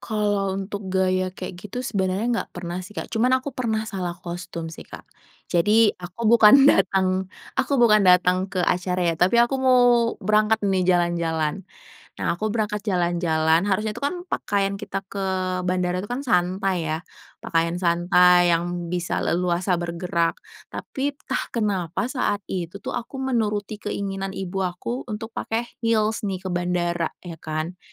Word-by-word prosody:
Kalau 205 -3 -1
untuk 195 0 -5
gaya 185 0 +1
kayak 185 - -7
gitu 230 +6 -6
sebenarnya 200 +3 0
gak - - -32
pernah 175 0 -4
sih, 205 +3 -12
Kak, - - -6
cuman 245 +3 +3
aku 260 +2 -5
pernah 220 -4 -1
salah 180 -4 -4
kostum 170 -2 -6
sih, - - -10
Kak. - - -11 0.5
Jadi 210 +5 +4
aku 180 +6 -7
bukan 235 +3 +8
datang 190 -6 +3 0.3
aku 270 +2 +1
bukan 225 -4 +5
datang 180 +1 +4
ke 180 -1 -1
acara 180 +1 0
ya, - - -4
tapi 185 +7 +4
aku 240 +3 +3
mau 255 -1 +5 0.4
berangkat 215 0 +2
nih 190 -2 +1
jalan-jalan. 170 0 0 0.5
Nah, - - -1
aku 215 +2 -2
berangkat 210 -2 -2
jalan-jalan, 170 -3 +1
harusnya 210 +2 -1
itu - - -5
kan 350 +5 -1
pakaian 200 -6 -1
kita 195 - -4
ke 195 -1 -4 0.4
bandara 180 0 0
itu 205 - -11
kan 250 - -2
santai 180 - 0
ya, 155 - -1 0.4
pakaian 170 +1 0
santai 175 0 +4
yang 175 0 -2
bisa 175 -1 -1
leluasa 175 +1 0
bergerak, 170 -1 -1 0.3
tapi 280 +1 -4
entah - - -3
kenapa 195 -7 -1
saat 205 -6 -1
itu 180 0 -4
tuh - - -3
aku 240 +3 -5
menuruti 215 -6 -1
keinginan 195 -1 -4
ibu 195 0 -3
aku 190 +8 -3
untuk 225 +1 -6
pakai 230 +2 -3
heels 220 -1 +1
nih 190 -2 -4
ke - - -2
bandara 175 -1 0 0.2
ya 170 -2 -8
kan, 155 +3 -4
190 Hz, 155 wpm, -23 LUFS, 175-215 Hz, 0.5 s, bukan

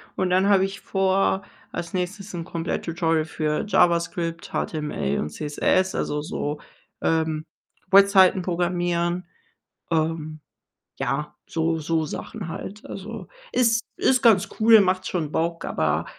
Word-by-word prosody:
und 185 -1 0
dann 190 +2 +3
habe 195 -1 +5
ich 195 +1 -7
vor, 195 0 +1 0.3
als 170 +1 -5
nächstes 190 +3 -4
'n 170 -2 -4
Komplett-Tutorial 165 -1 -1
für 155 +2 -2
JavaScript, 170 -2 +1
HTML 150 - -2
und 75 - -2
CSS, 185 - 0
also, 150 0 -1
so, 150 0 -3 0.4
ähm, 160 -1 0 0.5
Webseiten 195 -1 +6
programmieren. 175 0 -1 0.7
Ähm, 155 -1 -1 0.6
ja, - - -2
so 165 0 0
so 160 +1 0
Sachen 190 +5 -6
halt. 200 +5 -7
Also, 210 +4 -7 0.2
ist 230 -2 +3
ist 260 -1 +2
ganz 205 -4 +5
cool, 220 -1 +8
macht 185 -1 0
schon 160 -5 -2
Bock. 165 +1 -1
Aber, 80 +1 0
175 Hz, 125 wpm, -24 LUFS, 160-190 Hz, 0.7 s, cool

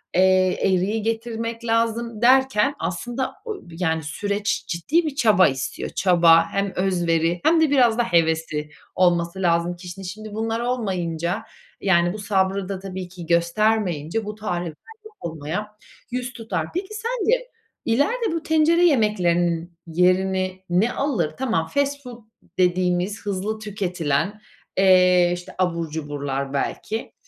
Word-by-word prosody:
eee, 185 0 +4
eriği 195 +4 +1
getirmek 230 +1 -3
lazım 230 0 0
derken 265 +1 +4
aslında 240 +8 -3
o 425 - -7
bir 165 0 -11
yani 160 -2 0
süreç 200 +7 -2
ciddi 290 - 0
bir 300 -3 -3
çaba 215 -9 +5
istiyor. 135 0 -3
Çaba 170 -3 +5
hem 200 -1 -1
özveri 175 -2 +1
hem 325 0 +4
de 315 - +4
biraz 245 -5 +4
da 240 - +3
hevesi 160 -5 0 0.3
olması 175 0 +2
lazım 170 0 +1
kişinin. 180 +2 -9
Şimdi 215 +3 -7
bunlar 225 +1 -2
olmayınca, 190 -6 -2 0.4
yani, 175 -2 +3
bu - - -6
sabrı 195 -1 0
da 195 -1 -3
tabii 190 -1 -6
ki 175 -2 -9
göstermeyince 175 +1 +1
bu 210 0 -5
tarifler 175 -6 -3 0.5
unutulmaya 170 +7 -5 0.3
yüz 250 0 -3
tutar. 195 -10 -3
Peki 380 +4 -4
sence 475 +2 0 0.4
ileride 420 - +1
bu 330 -1 -3
tencere 320 +2 +3
yemeklerinin 175 - +1
yerini 185 +2 +1
ne 190 +7 +2
alır? 215 - -1
Tamam, 225 -11 0
fast 285 +6 -1
food 240 -2 -10 0.3
dediğimiz 180 +2 +1
hızlı 205 +2 -2
tüketilen, 190 -3 -2 0.4
eee, 180 -2 +5
işte 175 0 -8
abur 170 -3 -1
cuburlar 145 -3 -4
belki, 215 +10 -3
190 Hz, 130 wpm, -23 LUFS, 175-230 Hz, 0.5 s, çaba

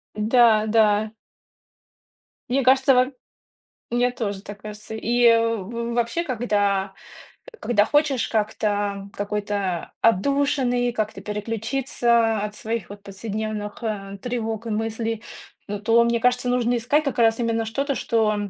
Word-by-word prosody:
Да 220 0 +4
да. 215 -1 +3 1.4
Мне 270 +2 +1
кажется 265 +1 +5
вам 255 +2 +2 0.8
мне 245 +1 +2
тоже 205 -5 -4
так 205 0 -10
кажется. 210 +1 -8
И 240 +2 +2
в 230 -2 0 0.3
в - - -3
вообще, 240 +8 0
когда, 205 - 0 0.6
э, - - -14
когда 210 -3 +2
хочешь 290 -2 +1
как-то 205 -2 -1
какой-то 205 -3 -3
отдушины 245 +2 +2
и - - -2
как-то 215 -4 -3
переключиться 225 +2 0
от 210 0 -4
своих 225 -3 -4
вот 205 0 -10
повседневных, 210 +1 -5
э, 200 -3 -4
тревог 230 -2 -3
и - - -3
мыслей, 225 +1 -2 0.4
ну, 205 0 -4
то, 230 +3 +4
мне 235 0 +1
кажется, 250 +1 +1
нужно 245 -1 +1
искать 285 +6 +1
как 275 - -2
раз 225 -1 +3
именно 230 -1 0
что-то, 275 +5 -2
что 220 -2 +1
225 Hz, 135 wpm, -23 LUFS, 210-245 Hz, 1.4 s, кажется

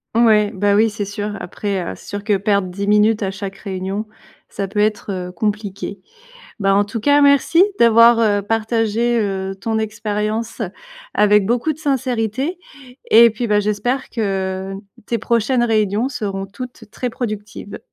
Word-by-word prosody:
Ouais, 215 -3 +4
bah, 200 +1 +2
oui, 220 +1 +3
c'est 205 -1 -4
sûr, 205 +1 -4
après, 195 +1 -3
heu, - - -5
c'est - - -16
sûr 205 0 -5
que 205 -1 +2
perdre 200 -1 +1
10 195 +3 -4
minutes 210 +1 +3
à 190 - -1
chaque 195 0 -7
réunion, 195 +1 -4 0.4
ça 200 -1 -4
peut 205 - -9
être, 210 -1 0
heu, 180 -1 -4
compliqué. 205 +1 -3 0.6
Bah, 195 -2 +2
en 205 +1 +3
tout 210 +3 -5
cas 285 +6 +4
merci 285 +4 +5 0.2
d'avoir, 230 0 +6
heu, 205 -3 +2
partagé, 225 +2 0
heu, 195 -2 -2
ton 220 +3 -2
expérience 220 +2 -3 0.5
avec 210 -1 +4
beaucoup 240 +7 +1
de 300 - -14
sincérité 265 - -1 0.5
et 230 +1 +7
puis, 225 +3 -3
bah, 210 -1 +3
j'espère 210 +6 -1
que 195 -3 -2 0.3
tes 235 - -1
prochaines 235 +3 +1
réunions 215 0 +1
seront 200 -7 -4
toutes 220 +2 -10
très 250 - -3
productives. 210 -4 -6
210 Hz, 160 wpm, -19 LUFS, 200-230 Hz, 0.6 s, et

